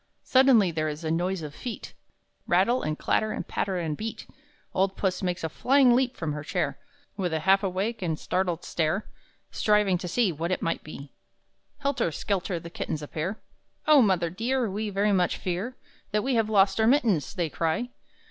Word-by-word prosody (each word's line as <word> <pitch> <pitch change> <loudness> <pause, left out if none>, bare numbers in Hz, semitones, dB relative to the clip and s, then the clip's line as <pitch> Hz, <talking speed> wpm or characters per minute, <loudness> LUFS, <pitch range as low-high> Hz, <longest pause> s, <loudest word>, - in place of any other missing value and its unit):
Suddenly 255 -8 +5
there 155 -1 -1
is 150 +2 -6
a 160 - -1
noise 175 +1 -1
of 150 -1 -7
feet 240 +6 -7 0.5
Rattle 195 +8 +3
and 155 0 -2
clatter 215 0 +1
and - - -4
patter 190 -2 -1
and 160 -3 -2
beat! 220 +7 -6 0.5
Old 190 +1 +1
Puss 185 -2 -1
makes 180 -2 -2
a - - +1
flying 255 - +4
leap 255 0 +1
from 160 -3 -2
her 150 0 -5
chair, - - -2 0.4
With 180 -4 -1
a 160 - -1
half 195 +3 +4
awake 195 +4 -2
and 165 -4 -1
startled 180 -1 -1
stare, 165 +5 -1 0.5
Striving 210 -4 +2
to 180 - -5
see 205 +2 +2
What 165 +2 -3
it 185 - -1
may 165 - 0
be. 145 -2 -10 0.7
Helter 275 - 0
skelter 185 +2 -2
the 170 +1 -10
kittens 155 -3 -4
appear; 165 +7 -4 0.4
"Oh 305 -3 +7
mother 180 -6 +2
dear, 240 +6 0
we 210 +2 -2
very 205 +1 +1
much 180 -2 +2
fear 190 +8 -3 0.3
That 210 0 0
we 270 - 0
have 225 -2 +2
lost 195 -1 +3
our 220 - +4
mittens!" 220 - +2
they 170 -5 -1
cry. 165 +10 -1
190 Hz, 185 wpm, -27 LUFS, 165-220 Hz, 0.7 s, Oh